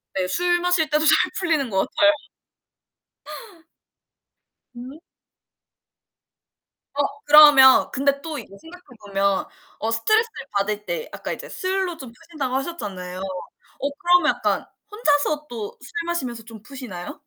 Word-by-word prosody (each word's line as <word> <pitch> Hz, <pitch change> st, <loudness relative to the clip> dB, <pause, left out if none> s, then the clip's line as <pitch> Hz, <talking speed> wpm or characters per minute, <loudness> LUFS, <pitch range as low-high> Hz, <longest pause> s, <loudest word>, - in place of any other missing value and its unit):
네. 185 Hz, -1 st, 0 dB
술 350 Hz, -, +1 dB
마실 350 Hz, -4 st, +1 dB
때도 305 Hz, +1 st, +1 dB
잘 315 Hz, -, +4 dB
풀리는 315 Hz, -8 st, 0 dB
것 190 Hz, -2 st, 0 dB
같아요. 310 Hz, 0 st, +6 dB, 2.6 s
음. 255 Hz, +5 st, -10 dB, 1.9 s
어 285 Hz, -, 0 dB, 0.2 s
그러면 290 Hz, -3 st, +8 dB
근데 280 Hz, +1 st, 0 dB
또 310 Hz, -1 st, -6 dB
이게 -, -, -8 dB
생각해 360 Hz, +2 st, -14 dB, 0.2 s
보면 195 Hz, 0 st, 0 dB, 0.3 s
어 225 Hz, -, -2 dB
스트레스를 435 Hz, -, 0 dB
받을 210 Hz, +1 st, -2 dB
때 -, -, -4 dB
아까 -, -, -5 dB
이제 -, -, -7 dB
술로 375 Hz, -2 st, -2 dB
좀 260 Hz, -3 st, -10 dB
푸신다고 275 Hz, +1 st, -6 dB
하셨잖아요. 200 Hz, -, -5 dB, 0.6 s
어 280 Hz, -, -1 dB
그러면 355 Hz, -1 st, +4 dB
약간 -, -, -1 dB, 0.3 s
혼자서 300 Hz, -7 st, 0 dB
또 225 Hz, -5 st, -7 dB
술 -, -, -13 dB
마시면서 255 Hz, -10 st, -4 dB
좀 225 Hz, -1 st, -12 dB
푸시나요? 235 Hz, -8 st, -9 dB
280 Hz, 255 characters per minute, -22 LUFS, 225-340 Hz, 2.6 s, 그러면